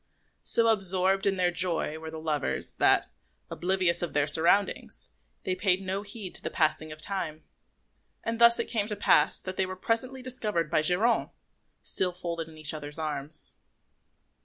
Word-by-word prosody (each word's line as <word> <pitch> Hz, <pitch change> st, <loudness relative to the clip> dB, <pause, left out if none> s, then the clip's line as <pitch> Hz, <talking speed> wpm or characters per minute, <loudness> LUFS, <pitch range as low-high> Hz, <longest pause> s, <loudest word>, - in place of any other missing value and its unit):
So 230 Hz, -1 st, +4 dB
absorbed 195 Hz, -2 st, +2 dB
in 195 Hz, -1 st, +1 dB
their 180 Hz, -1 st, +2 dB
joy 175 Hz, -3 st, -1 dB
were 160 Hz, 0 st, -7 dB
the 160 Hz, -, -8 dB
lovers 150 Hz, -3 st, -2 dB
that, -, -, +3 dB, 0.4 s
oblivious 180 Hz, -1 st, +1 dB
of 175 Hz, -, -3 dB
their 145 Hz, -1 st, +2 dB
surroundings, 170 Hz, +6 st, +1 dB, 0.3 s
they 185 Hz, -, -1 dB
paid 185 Hz, -1 st, +2 dB
no 195 Hz, +1 st, -3 dB
heed 205 Hz, -2 st, -6 dB
to -, -, +1 dB
the -, -, -3 dB
passing 155 Hz, -1 st, 0 dB
of 155 Hz, -, -9 dB
time; 160 Hz, -3 st, -2 dB, 0.8 s
and 230 Hz, 0 st, -3 dB
thus 235 Hz, 0 st, +7 dB
it -, -, -1 dB
came 215 Hz, -3 st, -2 dB
to 210 Hz, -, -2 dB
pass 155 Hz, -6 st, +3 dB
that 185 Hz, 0 st, -6 dB
they 190 Hz, -, +2 dB
were 185 Hz, -, -6 dB
presently 250 Hz, +6 st, -2 dB
discovered 210 Hz, -10 st, -2 dB
by -, -, +3 dB
Geronte, 195 Hz, +9 st, +3 dB, 0.5 s
still 180 Hz, -1 st, 0 dB
folded 170 Hz, -2 st, -5 dB
in 160 Hz, -, -14 dB
each 155 Hz, -1 st, -3 dB
other's 150 Hz, -1 st, -6 dB
arms. 150 Hz, -, -2 dB
180 Hz, 170 wpm, -28 LUFS, 155-200 Hz, 0.8 s, thus